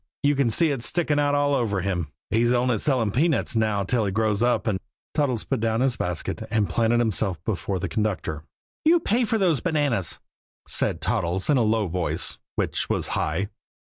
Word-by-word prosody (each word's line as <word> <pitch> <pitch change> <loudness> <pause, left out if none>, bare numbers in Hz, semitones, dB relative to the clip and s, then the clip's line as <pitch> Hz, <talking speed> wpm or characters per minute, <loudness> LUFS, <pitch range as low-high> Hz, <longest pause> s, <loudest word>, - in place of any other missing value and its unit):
You 145 0 +3
can 135 -3 +2
see 155 +7 +2
it 135 -4 -2
sticking 150 +4 +1
out 145 0 +2
all 145 0 +2
over 105 -7 0
him! 90 -6 -2 0.2
He's 120 +3 +3
only 120 -2 +1
selling 125 -8 +1
peanuts 145 - +1
now 110 -3 +1
till 115 +4 +1
he 100 - -1
grows 110 0 0
up 120 0 +2
and 105 -5 0 0.2
" - - -79
Toddles 130 -7 0
put 135 - -2
down 115 +1 0
his 130 -2 +2
basket 90 -2 -3
and 105 -2 +1
planted 115 0 +2
himself 110 -5 0
before 95 -1 -2
the 90 - -2
conductor. 95 -8 -2 0.4
"You 335 +2 +5
pay 240 -3 +1
for 225 - 0
those 180 -8 +2
bananas," 145 - 0 0.5
said - - 0
Toddles 95 - 0
in 145 - +4
a - - +3
low 110 -1 +2
voice 90 0 -1 0.2
which - - -1
was - - 0
high. 95 +7 -1
115 Hz, 195 wpm, -24 LUFS, 100-140 Hz, 0.5 s, You